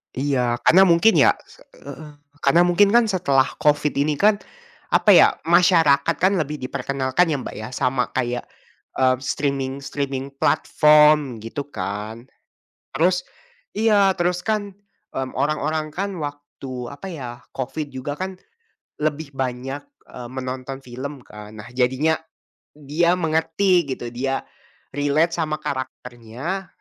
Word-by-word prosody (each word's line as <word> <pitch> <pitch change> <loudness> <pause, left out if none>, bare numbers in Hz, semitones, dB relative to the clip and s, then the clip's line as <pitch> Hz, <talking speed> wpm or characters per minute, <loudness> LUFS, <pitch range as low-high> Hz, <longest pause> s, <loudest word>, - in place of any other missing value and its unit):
Iya 125 -3 0
karena 190 +3 +7
mungkin 170 +6 +5
ya - - +5
se - - -20 0.2
heeh, 155 -1 -9 0.3
karena 145 +6 +4
mungkin 180 +3 +4
kan 240 - +6
setelah 140 -8 +2
COVID 150 0 +2
ini 150 +2 +2
kan, 205 +6 +3 0.6
apa - - +3
ya - - +8 0.2
masyarakat 165 -3 +4
kan 185 +2 +2
lebih 150 -1 -2
diperkenalkan 135 +5 0
ya 155 - 0
Mbak - - -7
ya 110 +1 -6
sama 125 0 0
kayak, 125 -1 -1 0.5
eee, 130 -1 +3
streaming-streaming 135 0 -3
platform 150 -5 +4
gitu 135 +5 -5
kan, 105 +4 -5 0.7
terus, 180 +3 +2 0.6
iya 205 -3 +4
terus 175 0 0
kan, 210 -2 -1 0.4
mmm, 130 -1 -4
orang-orang 155 +2 -1
kan 195 +3 -3
waktu 145 -2 -8 0.2
apa 140 +7 -9
ya 135 -7 -6 0.2
COVID 140 +3 -4
juga 130 +2 -4
kan, 190 +1 -4 0.7
lebih 150 -1 -2
banyak, 130 +1 -4 0.2
eee, 125 -1 -9
menonton 130 +1 -6
film 130 +2 -7
kan 105 0 -11
nah 105 +2 -10
jadinya, 130 +5 +2 0.6
dia 150 +4 +1
mengerti 165 +1 +1
gitu 120 -2 -6
dia, 135 +2 -2 0.5
relate 145 +4 +1
sama 155 -2 -1
karakternya, 130 - -5
145 Hz, 130 wpm, -22 LUFS, 130-165 Hz, 0.7 s, ya